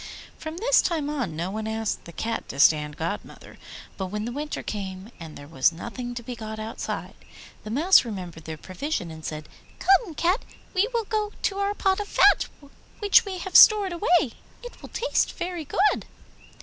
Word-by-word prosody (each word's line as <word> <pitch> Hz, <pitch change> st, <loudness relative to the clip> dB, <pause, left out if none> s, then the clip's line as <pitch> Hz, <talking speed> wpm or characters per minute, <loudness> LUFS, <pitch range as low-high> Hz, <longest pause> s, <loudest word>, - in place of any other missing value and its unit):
From 315 Hz, +1 st, -7 dB
this -, -, +4 dB
time 310 Hz, -4 st, -1 dB
on 255 Hz, -, -3 dB
no 170 Hz, +4 st, -3 dB
one 215 Hz, +1 st, -4 dB
asked 220 Hz, -1 st, -3 dB
the 170 Hz, -, -10 dB
Cat 225 Hz, +7 st, -4 dB
to 135 Hz, -, -6 dB
stand 150 Hz, 0 st, +4 dB
godmother; 170 Hz, +6 st, -6 dB, 0.4 s
but 190 Hz, -, -3 dB
when 210 Hz, +3 st, -4 dB
the 240 Hz, -, -3 dB
winter 295 Hz, +3 st, -4 dB
came 195 Hz, 0 st, -6 dB
and 160 Hz, -2 st, -9 dB
there 145 Hz, -, -11 dB
was 145 Hz, 0 st, +3 dB
nothing 245 Hz, +8 st, -6 dB
to 240 Hz, -, -6 dB
be 245 Hz, +1 st, -6 dB
got 220 Hz, -1 st, -7 dB
outside, 220 Hz, +1 st, -5 dB, 0.5 s
the 215 Hz, -, -7 dB
Mouse 315 Hz, -, +5 dB
remembered 180 Hz, -8 st, -7 dB
their 160 Hz, -1 st, -6 dB
provision 185 Hz, -, -4 dB
and 160 Hz, 0 st, -10 dB
said, 155 Hz, -1 st, -5 dB, 0.3 s
'Come, 385 Hz, -2 st, +3 dB
Cat, 360 Hz, +9 st, +1 dB, 0.3 s
we 385 Hz, +3 st, +3 dB
will 465 Hz, -2 st, -1 dB
go 425 Hz, -1 st, -2 dB
to 395 Hz, 0 st, 0 dB
our 400 Hz, +1 st, 0 dB
pot 385 Hz, -1 st, +1 dB
of 410 Hz, -, -3 dB
fat 410 Hz, -, +5 dB, 0.5 s
which 410 Hz, 0 st, +5 dB
we 385 Hz, -2 st, -4 dB
have 365 Hz, 0 st, -7 dB
stored 410 Hz, -4 st, +8 dB
away; 345 Hz, -, +2 dB, 0.3 s
it 485 Hz, -, -10 dB
will -, -, -10 dB
taste -, -, 0 dB
very 345 Hz, -3 st, -4 dB
good. 400 Hz, +8 st, +1 dB
245 Hz, 190 wpm, -25 LUFS, -, 0.5 s, stored